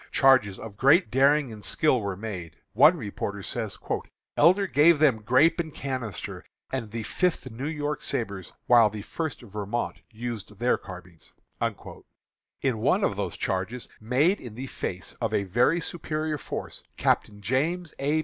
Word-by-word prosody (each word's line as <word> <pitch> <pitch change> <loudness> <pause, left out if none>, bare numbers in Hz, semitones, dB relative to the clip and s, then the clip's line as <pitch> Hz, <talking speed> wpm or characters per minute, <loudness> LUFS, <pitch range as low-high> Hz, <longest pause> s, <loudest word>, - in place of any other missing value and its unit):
Charges 130 -8 +4
of 100 -3 -9
great 145 - +5
daring 135 0 +3
and 105 -1 -11
skill 140 -6 +2
were 100 -2 -3
made. 90 -7 -6 0.2
One 150 - +6
reporter 100 -4 -5
says: 110 -2 -4 0.6
"Elder 185 +6 +5
gave 165 -1 +5
them 140 -7 +3
grape 130 +11 +4
and 160 -2 -2
canister, 130 -8 -5 0.3
and 130 -5 -3
the 115 +1 -4
Fifth 180 - -1
New 125 +6 -5
York 150 -2 -2
sabres, 100 -5 -3
while 115 -3 +6
the 105 0 -7
First 160 +5 -4
Vermont 105 +2 -3
used 110 -2 -6
their 120 +3 +2
carbines." 90 -3 -12 1.3
In 130 -5 +1
one 180 - +2
of 100 - +1
those 95 -4 -3
charges, 95 +7 -3
made 135 - +2
in 115 -4 -9
the 130 +3 -5
face 95 -7 -5
of 110 -2 0
a 100 - +1
very 120 - +2
superior 155 -2 -3
force, - - -6 0.2
Captain 105 -1 +1
James 150 - -1
A. 145 +3 +1
120 Hz, 155 wpm, -26 LUFS, 105-150 Hz, 1.3 s, One